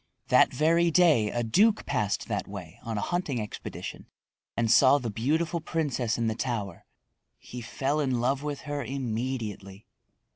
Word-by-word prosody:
That -, -, +5 dB
very 165 Hz, +5 st, +3 dB
day 155 Hz, -11 st, +4 dB
a 120 Hz, +2 st, -1 dB
duke 205 Hz, -, +3 dB
passed 110 Hz, -8 st, -1 dB
that -, -, -2 dB
way -, -, -9 dB
on 115 Hz, -2 st, -4 dB
a -, -, -1 dB
hunting 175 Hz, -8 st, -1 dB
expedition 105 Hz, -1 st, -7 dB, 0.5 s
and 115 Hz, -1 st, +2 dB
saw 130 Hz, +4 st, +7 dB
the 120 Hz, -5 st, -4 dB
beautiful 160 Hz, -, 0 dB
princess 145 Hz, -8 st, -1 dB
in 115 Hz, -, 0 dB
the 110 Hz, -, +1 dB
tower. 110 Hz, -6 st, -4 dB, 0.5 s
He 125 Hz, -, -9 dB
fell 135 Hz, +5 st, -1 dB
in 130 Hz, -4 st, 0 dB
love 130 Hz, +3 st, +1 dB
with 145 Hz, -1 st, -4 dB
her 145 Hz, -1 st, -4 dB
immediately. 115 Hz, -6 st, -4 dB
130 Hz, 155 wpm, -28 LUFS, 115-150 Hz, 0.5 s, saw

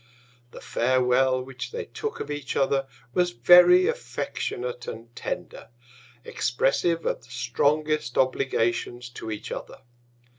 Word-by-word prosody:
The -, -, -12 dB
Farewel 130 Hz, +1 st, +2 dB
which 130 Hz, 0 st, -7 dB
they 470 Hz, 0 st, -4 dB
took 440 Hz, -1 st, -5 dB
of -, -, -5 dB
each 145 Hz, -2 st, -4 dB
other, 135 Hz, 0 st, +1 dB, 0.3 s
was 180 Hz, +3 st, +2 dB
very 180 Hz, -, +7 dB
affectionate 125 Hz, -, -3 dB
and 115 Hz, +1 st, -8 dB
tender, -, -, -6 dB, 0.6 s
expressive 165 Hz, +7 st, 0 dB
of -, -, -1 dB
the 115 Hz, -, -19 dB
strongest 145 Hz, +2 st, 0 dB
Obligations 120 Hz, -2 st, 0 dB
to 120 Hz, -2 st, -8 dB
each 105 Hz, -1 st, -6 dB
other. -, -, -7 dB
130 Hz, 120 wpm, -26 LUFS, 120-155 Hz, 0.6 s, very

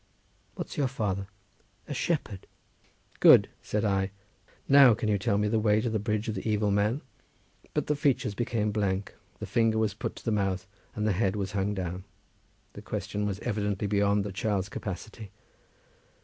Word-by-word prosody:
"What's -, -, -6 dB
your 140 Hz, -2 st, +2 dB
father?" 100 Hz, -6 st, -2 dB, 0.6 s
"A 145 Hz, -, -4 dB
shepherd." 130 Hz, -, -2 dB, 0.7 s
"Good," -, -, +7 dB
said 105 Hz, +1 st, -1 dB
I. 95 Hz, -1 st, +1 dB, 0.6 s
"Now 135 Hz, -4 st, +8 dB
can 110 Hz, 0 st, -2 dB
you 100 Hz, -1 st, +2 dB
tell 100 Hz, 0 st, +1 dB
me 105 Hz, 0 st, +1 dB
the 110 Hz, +1 st, +1 dB
way 105 Hz, -1 st, +3 dB
to 115 Hz, +1 st, -1 dB
the 110 Hz, -, 0 dB
bridge 105 Hz, +1 st, -1 dB
of 110 Hz, -, -1 dB
the 100 Hz, +2 st, -3 dB
evil 105 Hz, -1 st, +1 dB
man?" 105 Hz, +7 st, +1 dB, 0.7 s
But -, -, +1 dB
the 150 Hz, -, 0 dB
features 140 Hz, -7 st, +1 dB
became 110 Hz, -1 st, -1 dB
blank, 100 Hz, -2 st, -1 dB, 0.2 s
the -, -, -6 dB
finger 115 Hz, -1 st, +2 dB
was 110 Hz, -2 st, +1 dB
put 105 Hz, -, -5 dB
to -, -, -13 dB
the 115 Hz, -, +1 dB
mouth, 95 Hz, -3 st, 0 dB, 0.3 s
and 105 Hz, -, -1 dB
the 110 Hz, -, +3 dB
head 95 Hz, +1 st, +1 dB
was 100 Hz, -2 st, -3 dB
hung 100 Hz, 0 st, -1 dB
down. 90 Hz, -1 st, -4 dB, 0.7 s
That -, -, -10 dB
question 105 Hz, 0 st, -3 dB
was 100 Hz, -2 st, -2 dB
evidently 105 Hz, -3 st, -1 dB
beyond 100 Hz, 0 st, +2 dB
the 100 Hz, -, -4 dB
child's 100 Hz, 0 st, -1 dB
capacity. 105 Hz, +2 st, -7 dB
105 Hz, 175 wpm, -28 LUFS, 100-110 Hz, 0.7 s, Now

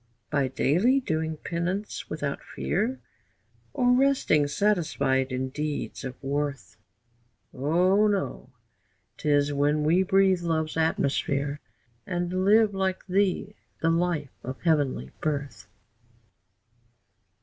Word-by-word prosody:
By 140 Hz, -3 st, +2 dB
daily 180 Hz, -, +2 dB
doing 160 Hz, -8 st, -2 dB
penance 175 Hz, +6 st, -3 dB
without 145 Hz, -2 st, -3 dB
fear, 225 Hz, +8 st, -2 dB, 0.7 s
Or 245 Hz, 0 st, +2 dB
resting 255 Hz, -, +3 dB
satisfied 140 Hz, -8 st, +1 dB
in 130 Hz, +1 st, -2 dB
deeds 150 Hz, +2 st, -4 dB
of 130 Hz, -1 st, -5 dB
worth? 140 Hz, -4 st, -3 dB, 0.8 s
O 180 Hz, +9 st, +3 dB
no! 195 Hz, -10 st, -2 dB, 0.7 s
'Tis 145 Hz, -1 st, +2 dB
when 145 Hz, +2 st, +1 dB
we 165 Hz, +5 st, +4 dB
breathe 190 Hz, -1 st, +3 dB
love's 160 Hz, -2 st, -1 dB
atmosphere, 145 Hz, -2 st, 0 dB, 0.5 s
And 180 Hz, +1 st, -1 dB
live 215 Hz, +1 st, +5 dB
like 190 Hz, -1 st, -1 dB
thee 200 Hz, +1 st, 0 dB, 0.3 s
the 165 Hz, -, +4 dB
life 165 Hz, -5 st, 0 dB
of 130 Hz, +1 st, -6 dB
heavenly 145 Hz, -, +1 dB
birth. 145 Hz, -2 st, -3 dB
160 Hz, 105 wpm, -26 LUFS, 145-190 Hz, 0.8 s, live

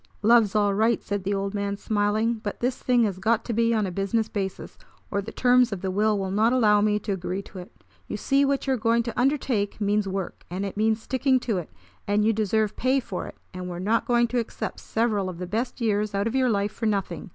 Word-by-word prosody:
"Love's 225 Hz, -2 st, +5 dB
all 205 Hz, -1 st, +3 dB
right!" 220 Hz, +3 st, +2 dB
said 205 Hz, -1 st, -3 dB
the 200 Hz, +2 st, -1 dB
old 195 Hz, 0 st, -2 dB
man, 200 Hz, -1 st, -2 dB
smiling; 215 Hz, +2 st, 0 dB
"but 205 Hz, -, -5 dB
this 250 Hz, +1 st, 0 dB
thing 245 Hz, -2 st, +3 dB
has 195 Hz, -4 st, -1 dB
got 225 Hz, +3 st, +1 dB
to 235 Hz, -, -2 dB
be 230 Hz, +1 st, +2 dB
on 215 Hz, -3 st, +1 dB
a 185 Hz, -, -3 dB
business 200 Hz, +4 st, 0 dB
basis, 195 Hz, -3 st, -5 dB, 0.4 s
or 200 Hz, -, 0 dB
the 215 Hz, +3 st, -8 dB
terms 250 Hz, -1 st, +3 dB
of 195 Hz, -3 st, -4 dB
the 190 Hz, -1 st, -2 dB
will 210 Hz, +2 st, +2 dB
will 190 Hz, -1 st, -2 dB
not 215 Hz, +4 st, +3 dB
allow 210 Hz, -5 st, +4 dB
me 210 Hz, 0 st, +2 dB
to 210 Hz, -, -4 dB
agree 190 Hz, +1 st, -3 dB
to 190 Hz, -, -10 dB
it. 180 Hz, -, -13 dB, 0.2 s
You -, -, -4 dB
see 275 Hz, 0 st, +2 dB
what 275 Hz, 0 st, 0 dB
you 270 Hz, -, +1 dB
are -, -, 0 dB
going 230 Hz, +1 st, +2 dB
to 235 Hz, 0 st, -4 dB
undertake 245 Hz, -7 st, 0 dB
means 205 Hz, 0 st, +1 dB
work, 190 Hz, -1 st, -4 dB
and 185 Hz, +3 st, -3 dB
it 195 Hz, -, -5 dB
means 220 Hz, +1 st, +1 dB
sticking 260 Hz, 0 st, +2 dB
to 220 Hz, -7 st, -1 dB
it; 170 Hz, -, -8 dB, 0.4 s
and 205 Hz, +1 st, +2 dB
you 225 Hz, -, +3 dB
deserve 215 Hz, 0 st, 0 dB
pay 260 Hz, +2 st, +2 dB
for 200 Hz, -7 st, -5 dB
it, -, -, -10 dB, 0.2 s
and 180 Hz, 0 st, -6 dB
we're 175 Hz, -, -5 dB
not 215 Hz, +6 st, 0 dB
going 240 Hz, -1 st, +3 dB
to 245 Hz, +1 st, 0 dB
accept 230 Hz, -, -5 dB
several 215 Hz, -4 st, 0 dB
of 180 Hz, -, -7 dB
the 180 Hz, -, -4 dB
best 230 Hz, +8 st, -3 dB
years 210 Hz, -2 st, 0 dB
out 200 Hz, +1 st, 0 dB
of 230 Hz, -, -1 dB
your 260 Hz, -1 st, +2 dB
life 205 Hz, -2 st, 0 dB
for 225 Hz, +1 st, -3 dB
nothing. 195 Hz, -6 st, -2 dB
210 Hz, 250 wpm, -25 LUFS, 200-235 Hz, 0.4 s, Love's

